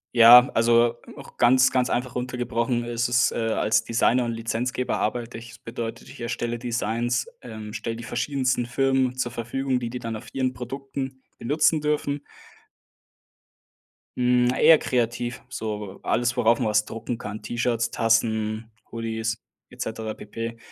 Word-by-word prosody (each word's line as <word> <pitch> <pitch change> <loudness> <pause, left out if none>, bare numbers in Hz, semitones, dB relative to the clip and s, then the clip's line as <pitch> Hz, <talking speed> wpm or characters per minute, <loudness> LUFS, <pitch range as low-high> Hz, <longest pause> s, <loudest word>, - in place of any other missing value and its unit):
Ja, 120 +2 +9
also 115 +1 +4 0.2
auch - - -13
ganz, 130 +2 +5
ganz 125 -1 +1
einfach 125 0 -2
runter 125 0 -3
gebrochen 120 0 -1
ist 120 0 -1
es, 120 0 +3
äh, - - -6
als 110 -1 +1
Designer 120 +1 +2
und 115 - -2
Lizenzgeber 115 +3 -2
arbeite 120 -1 -2
ich. 115 +1 -10
Das 115 - -15
bedeutet, 115 0 -6
ich - - -12
erstelle 120 0 -3
Designs, 120 0 -1
ähm, 110 -3 -8
stelle 115 +1 -4
die 115 - -8
verschiedensten 130 -1 -1
Firmen 130 0 +1
zur 125 -1 -2
Verfügung, 125 +3 -2
die 120 -1 -4
die 125 +1 -5
dann 115 -2 -4
auf - - -12
ihren 130 -1 0
Produkten 135 +1 -6 0.2
benutzen 155 +4 +2
dürfen. 145 -1 -1 1.9
Hm, 125 0 +3
eher 165 - +8
kreativ, 120 -2 -1
so 105 -5 -5
alles, 120 +1 +1
worauf 120 -2 +3
man - - 0
was 105 0 +3
drucken 115 +2 -5
kann, 105 0 -7
T-Shirts, 120 +1 -1
Tassen, 110 -1 +1 0.2
Hoodies, 115 0 -3 0.3
et 125 - -16
cetera 110 -2 -4
pp. 115 +3 -6
120 Hz, 155 wpm, -25 LUFS, 115-125 Hz, 1.9 s, Ja